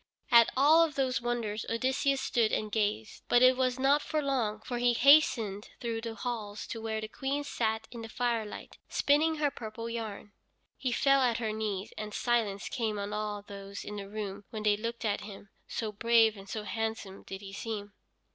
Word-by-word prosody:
At 235 -1 +8
all 310 +5 +7
of 310 -4 -1
those 260 -3 0
wonders 230 -3 -2
Odysseus 265 +4 +1
stood 235 -4 +1
and 215 -1 -1
gazed, 205 - -1
but 245 +1 +5
it 255 0 +7
was 255 -1 +1
not 275 +3 +3
for 310 - -1
long; 250 -7 0
for 240 +2 -4
he 245 0 +3
hastened 235 -7 +4
through 230 -1 -3
the 225 -1 -5
halls 215 -2 -4
to 225 - -5
where 220 -1 -2
the 220 - -5
Queen 275 +5 -2
sat 220 -5 -1
in 235 -1 -7
the 225 - -7
firelight, 230 -3 -3
spinning 310 +3 +3
her 295 -2 +1
purple 230 -1 -7
yarn. 220 -3 -5 0.4
He 255 - -2
fell 275 +2 +4
at 240 -3 +2
her 220 -3 -2
knees, 210 -2 -3
and 210 -1 -5
silence 225 -5 0
came 220 -4 -2
on 200 +1 -4
all 210 -1 -3
those 200 0 -8
in 210 - -6
the 195 -1 -7
room 205 -1 -5
when 215 -2 -5
they 210 -1 +4
looked 230 +2 -4
at 205 -1 0
him, 200 -1 -10 0.2
so 220 -2 -3
brave 225 +1 +4
and 195 -1 -12
so 215 +1 -4
handsome 220 -3 -4
did 195 +1 -8
he 195 -1 -9
seem. 205 -1 -5
225 Hz, 195 wpm, -30 LUFS, 210-245 Hz, 0.4 s, At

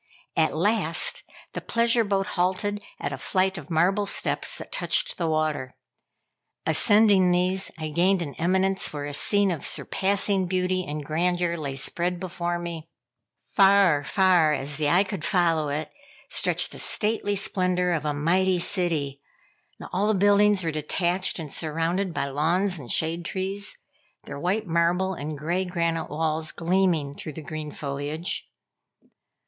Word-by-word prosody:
At 160 -1 +1
last 190 -3 +1 0.3
the - - -4
pleasure 235 0 +2
boat 195 -2 0
halted 190 +3 0 0.2
at - - -3
a - - -6
flight 190 -1 0
of 150 - -12
marble 185 +5 +2
steps - - -1
that - - -10
touched - - 0
the - - 0
water. 155 -4 -1 0.9
Ascending 205 -3 +5
these, 180 +2 +1
I 155 -1 -4
gained 180 +4 +2
an 145 -4 -7
eminence 190 +3 +1
where 145 -1 -5
a 145 - -5
scene 200 +6 +2
of 165 - -4
surpassing 195 -1 0
beauty 185 0 0
and 150 0 -5
grandeur 175 +3 0
lay 145 -5 -4
spread 175 +6 -2
before 175 -1 -3
me. 170 -2 -6 0.5
Far, 195 -6 +4
far 180 -3 +3
as 140 0 -2
the 150 -1 +1
eye 180 +5 +4
could 195 -4 -6
follow 165 -6 +2
it, 150 +2 -3 0.4
stretched - - +1
the - - -9
stately 210 -1 0
splendor 180 -2 0
of 160 -3 -1
a 150 - 0
mighty 180 +6 +2
city. 165 -7 -1 0.6
But - - -10
all 195 +3 +1
the 215 - +2
buildings 205 0 +4
were 165 - -1
detached 175 +4 0
and 155 -5 -5
surrounded 165 +4 0
by 150 - -2
lawns 170 +7 0
and 125 -5 -5
shade 165 +2 +1
trees, 195 +2 -4 0.5
their - - -7
white 195 +7 0
marble 175 +2 +1
and 150 -2 -5
gray 170 +6 -1
granite 170 -3 -1
walls 155 +1 -1
gleaming 170 -5 +1
through 155 +1 -7
the 160 - -8
green 155 +1 -6
foliage. 145 +4 -4
175 Hz, 155 wpm, -25 LUFS, 155-190 Hz, 0.9 s, Ascending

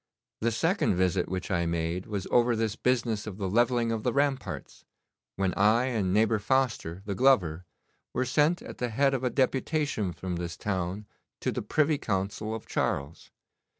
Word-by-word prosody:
The 115 +1 +1
second 165 - +1
visit 90 0 +1
which 95 +1 -4
I 85 -2 +1
made 85 +2 -2
was 100 -3 -3
over 120 0 +4
this 110 -1 -1
business 115 -4 0
of 100 -3 -6
the 100 -2 -2
levelling 120 +3 +2
of 115 -1 -1
the 125 - 0
ramparts, 140 -1 -2 0.5
when 95 -1 0
I 110 +5 +4
and 105 -7 0
neighbour 110 +2 +3
Foster, 115 -7 0
the 100 - -2
glover, 95 -9 +3 0.5
were 130 - 0
sent 150 +7 +2
at - - -9
the 125 - -1
head 135 +4 +2
of 130 -1 -1
a 125 - +2
deputation 135 - 0
from 90 +1 -4
this 85 0 -5
town 95 +1 -3 0.4
to - - 0
the - - -3
Privy 150 +7 +1
Council 105 +2 -2
of 110 - -8
Charles. 70 +3 -2
110 Hz, 175 wpm, -28 LUFS, 95-125 Hz, 0.5 s, over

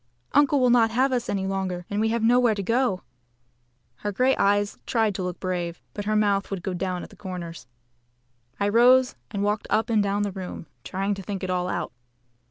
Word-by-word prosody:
Uncle 290 0 +4
will 250 -1 +4
not 235 -2 +5
have 255 +4 +2
us 245 -1 -1
any 195 -1 -1
longer, 190 -2 -2
and 205 +1 -1
we 220 - +2
have 230 0 0
nowhere 240 -1 +4
to 200 - -3
go 230 0 +2
to." - - -25 0.9
Her 205 - -3
grey 255 +6 +2
eyes 205 +1 +1
tried 220 -3 +2
to 190 - -4
look 180 -1 -4
brave, 175 -2 -3
but 205 - -5
her 215 +1 +1
mouth 205 -2 +2
would 195 -3 -4
go 190 - -2
down 180 0 -3
at - - -11
the - - -14
corners. 175 -6 -7 0.9
I 200 - +1
rose 250 +4 +5
and 200 -1 -3
walked 205 +1 -1
up 225 +2 +1
and 215 -2 +4
down 200 0 0
the 205 - -2
room, 185 -3 -7 0.2
trying 195 +5 -2
to 195 - -6
think 195 0 -5
it 185 - -2
all 180 0 -1
out. - - -3
205 Hz, 215 wpm, -25 LUFS, 185-230 Hz, 0.9 s, not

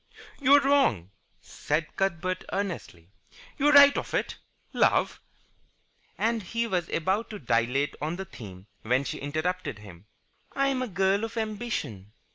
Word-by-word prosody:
"You're 280 +1 +6
wrong," 270 - +2 0.3
said 155 +2 -3
Cuthbert, 185 -1 -1
earnestly. 165 - -5 0.5
"You're 295 +2 +4
right 285 0 +9
off - - -3
it. - - -2 0.4
Love - - +2 0.5
" - - -40
And 230 -1 -1
he 230 +5 -2
was 180 -7 -2
about 190 +7 -1
to 215 - -6
dilate 125 - 0
on 155 +3 -2
the 190 +1 -6
theme 95 - -11 0.2
when 125 +4 +1
she - - -5
interrupted 155 - -3
him. 100 -2 -14 0.5
"I 275 0 +1
am 260 -2 -1
a 255 - -2
girl 195 +1 +1
of 225 +1 -5
ambition." 215 - -4
185 Hz, 145 wpm, -27 LUFS, -, 0.5 s, right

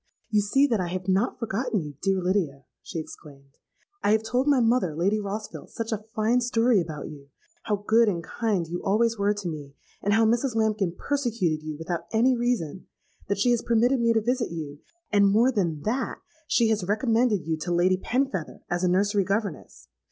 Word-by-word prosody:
'You 210 -1 +4
see 270 +8 +3
that 235 -7 +1
I 180 - -1
have 185 +1 -4
not 195 +5 +1
forgotten 230 0 -1
you, 150 -1 -8
dear 190 -1 +1
Lydia,' 165 -8 -1 0.2
she 175 - -7
exclaimed. 140 -3 -10 0.4
'I 205 - +3
have 220 0 +2
told 250 +5 0
my 285 -3 +4
mother, 230 -9 +2
Lady 195 +6 +1
Rossville, 210 +1 -6
such 230 0 -5
a 215 -1 -3
fine 225 +3 +2
story 235 -3 +3
about 155 -3 -6
you,—how 205 - -7
good 225 0 +5
and 170 -4 -3
kind 205 -3 -1
you 175 +2 -4
always 225 +2 +1
were 205 +1 +2
to 205 -3 -5
me, 145 -4 -7 0.3
and 205 +1 +2
how 225 0 +4
Mrs. 235 +2 +1
Lambkin 215 -5 0
persecuted 230 - -1
you 155 -1 -5
without 165 +2 -4
any 245 +3 +3
reason,—that 200 -3 -4
she 245 +5 +3
has 240 -1 +2
permitted 240 +3 +2
me 230 0 +3
to 225 -1 +2
visit 245 +2 0
you; 150 -4 -6 0.3
and, 200 -1 +5
more 225 +6 +4
than 170 - -1
that, 235 - -2 0.3
she 230 -2 +3
has 215 -3 +1
recommended 220 +1 +1
you 160 0 0
to 175 +3 -4
Lady 180 +2 +3
Penfeather 250 - -2
as 175 +1 0
a - - +3
nursery 200 +2 +2
governess. 190 - -4
205 Hz, 190 wpm, -26 LUFS, 175-230 Hz, 0.4 s, good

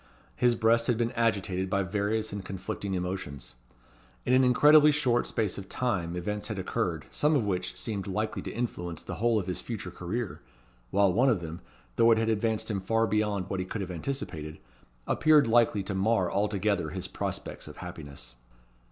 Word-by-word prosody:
His 120 -1 +3
breast 115 +1 +3
had 120 -3 +2
been 120 0 0
agitated 100 -6 0
by 100 0 +1
various 105 +3 -1
and 100 -1 -4
conflicting 95 +1 -4
emotions. 90 -8 -5 0.7
In - - +2
an 130 +1 +6
incredibly 150 +4 +7
short 125 -5 +2
space 105 -5 -1
of 95 - -10
time 90 -9 -1
events 105 +4 -3
had 110 -2 -4
occurred, 90 -4 -2
some 150 +1 +2
of 135 - +2
which 90 -2 -2
seemed 100 +1 -3
likely 105 +3 -2
to - - -6
influence 90 -8 -4
the - - -6
whole 115 -1 +3
of 100 - -1
his 90 -1 -2
future 100 -6 -5
career; 95 +5 -4 0.5
while 100 -2 +3
one 125 +7 +4
of 110 -7 +2
them, 85 0 -7 0.4
though 115 - +6
it 115 - +6
had 115 0 +1
advanced 110 0 0
him 100 -2 -2
far 115 +4 +2
beyond 105 -4 0
what 95 - -3
he 90 - -2
could 105 - -4
have 95 -1 -4
anticipated, 80 - -4 0.5
appeared 155 -2 +4
likely 115 -3 +3
to 95 - -4
mar 95 -1 +1
altogether 100 -4 0
his 95 +1 -4
prospects - - -4
of - - -10
happiness. 70 -5 -8
105 Hz, 185 wpm, -29 LUFS, 95-115 Hz, 0.7 s, incredibly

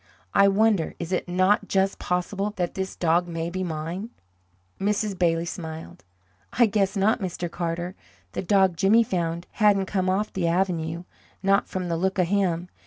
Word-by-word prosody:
I 200 0 +6
wonder 200 -3 +2
is 170 +1 -6
it 185 - -1
not 185 +3 +2
just 195 0 +1
possible 195 +3 -2
that 175 -2 -2
this 190 0 -4
dog 175 +1 +2
may 165 0 -3
be 185 +1 -3
mine?" 170 +5 -4 0.7
Mrs. 205 0 0
Bailey 170 -2 +1
smiled. 160 - -7 0.5
"I 240 - +5
guess 200 -2 0
not, 215 +5 +3
Mr. 175 -2 -4
Carter. 175 +1 -3 0.4
The - - -3
dog 190 -2 +3
Jimmy 210 +5 +5
found 170 -4 -2
hadn't 205 -3 +3
come 185 -1 -1
off 205 +3 0
the 180 -3 0
avenue 170 -2 0 0.4
not 195 +1 +3
from 185 -1 -4
the 170 -1 -1
look 190 +3 0
of 180 -2 +2
him. 180 -4 +1
185 Hz, 170 wpm, -25 LUFS, 170-195 Hz, 0.7 s, I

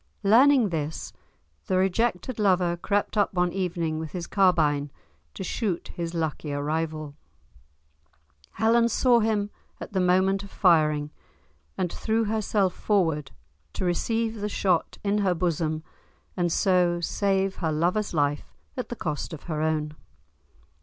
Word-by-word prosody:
Learning 240 +3 +5
this, 155 -2 -4 0.5
the 185 - +1
rejected 210 +4 0
lover 180 -4 +2
crept 205 +4 -1
up 205 - +3
one 180 -1 +1
evening, 170 -4 -2
with 160 -2 -6
his 175 -2 -4
carbine, 155 -7 +2 0.5
to - - -5
shoot 190 -1 -2
his 170 0 -5
luckier 150 -3 -2
rival; 155 -1 -2 1.4
Helen 230 +1 +3
saw 240 +1 +4
him 210 -2 0 0.3
at - - -8
the 190 - +1
moment 190 +2 +3
of 200 - -10
firing, 155 -6 +2 0.7
and 180 - -1
threw 225 +1 0
herself 210 -3 0
forward 160 -9 0 0.4
to - - -3
receive 225 +5 -1
the 210 - -2
shot 185 -4 0
in 205 +1 +1
her 190 -3 +2
bosom, 160 -2 -1 0.5
and 175 -2 0
so 180 -1 +2
save 195 +2 0
her 160 -3 -1
lover's 180 +7 0
life 145 -2 -1 0.2
at 250 - -4
the 240 - -4
cost 155 -4 -4
of 155 - -8
her 155 -3 -3
own. 155 -1 -1
180 Hz, 140 wpm, -26 LUFS, 160-205 Hz, 1.4 s, Learning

